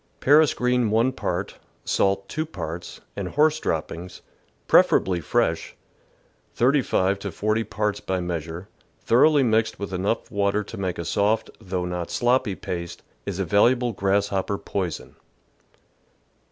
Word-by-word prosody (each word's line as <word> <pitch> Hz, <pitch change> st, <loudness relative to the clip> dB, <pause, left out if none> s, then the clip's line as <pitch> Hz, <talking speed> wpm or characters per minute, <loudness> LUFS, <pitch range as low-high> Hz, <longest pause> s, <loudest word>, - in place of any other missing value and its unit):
Paris 150 Hz, +2 st, +5 dB
green 125 Hz, -2 st, +1 dB
1 115 Hz, +4 st, +2 dB
part, -, -, -4 dB, 0.3 s
salt 100 Hz, 0 st, +1 dB
2 155 Hz, +9 st, -2 dB
parts, 90 Hz, -, -7 dB
and -, -, -3 dB
horse 155 Hz, +1 st, +2 dB
droppings 85 Hz, -, -4 dB, 0.4 s
(preferably 90 Hz, -2 st, +4 dB
fresh) -, -, 0 dB, 0.8 s
S5 120 Hz, -7 st, +2 dB
to 100 Hz, 0 st, -5 dB
40 110 Hz, +5 st, 0 dB
parts 105 Hz, 0 st, -2 dB
by 95 Hz, -1 st, -2 dB
measure, 85 Hz, +1 st, -4 dB, 0.4 s
thoroughly 140 Hz, +4 st, +5 dB
mixed 110 Hz, -2 st, +1 dB
with 100 Hz, -1 st, -6 dB
enough 95 Hz, +5 st, -1 dB
water 100 Hz, +1 st, +1 dB
to -, -, -9 dB
make 95 Hz, -2 st, -3 dB
a 85 Hz, -, -4 dB
soft 105 Hz, +2 st, +1 dB
though 95 Hz, -4 st, -3 dB
not 90 Hz, -1 st, -4 dB
sloppy 120 Hz, -4 st, +1 dB
paste, 85 Hz, -2 st, -6 dB, 0.2 s
is 100 Hz, -3 st, -3 dB
a 95 Hz, -, -1 dB
valuable 120 Hz, +6 st, +3 dB
grasshopper 100 Hz, 0 st, 0 dB
poison. 90 Hz, -6 st, -4 dB
100 Hz, 130 wpm, -24 LUFS, 90-120 Hz, 0.8 s, Paris